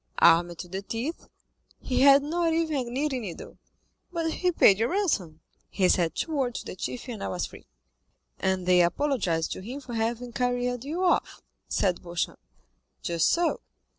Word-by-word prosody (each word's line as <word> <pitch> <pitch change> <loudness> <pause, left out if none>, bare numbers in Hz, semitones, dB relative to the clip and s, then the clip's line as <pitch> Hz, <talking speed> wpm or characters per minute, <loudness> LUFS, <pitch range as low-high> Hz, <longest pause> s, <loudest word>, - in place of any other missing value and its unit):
"Armed 175 +1 +5
to 175 - -7
the 190 +2 -5
teeth?" 235 +10 -5 0.5
"He 255 - -1
had 275 0 +7
not 330 +2 0
even 315 -6 0
a - - -5
knitting 265 +1 -1
needle." 190 -7 -8 0.5
"But 330 -2 -1
he 360 +2 0
paid 200 - +5
your 230 +2 +1
ransom?" 200 - -1 0.3
"He 190 -2 +2
said 170 -3 +2
two 325 - -2
words 255 -4 -1
to - - -15
the - - -6
chief 240 +7 -5
and 230 -5 -6
I - - -2
was 180 - -2
free." - - -13 0.7
"And 190 -1 0
they 180 0 +5
apologized 175 - 0
to - - -4
him 245 +8 -6
for 255 -4 -9
having 235 +2 -2
carried 245 0 -1
you 330 +6 -2
off?" 355 - +1 0.3
said 180 -3 +1
Beauchamp. 175 0 -3 0.6
"Just 170 -2 +2
so." 345 0 +1
245 Hz, 175 wpm, -27 LUFS, 185-290 Hz, 0.7 s, had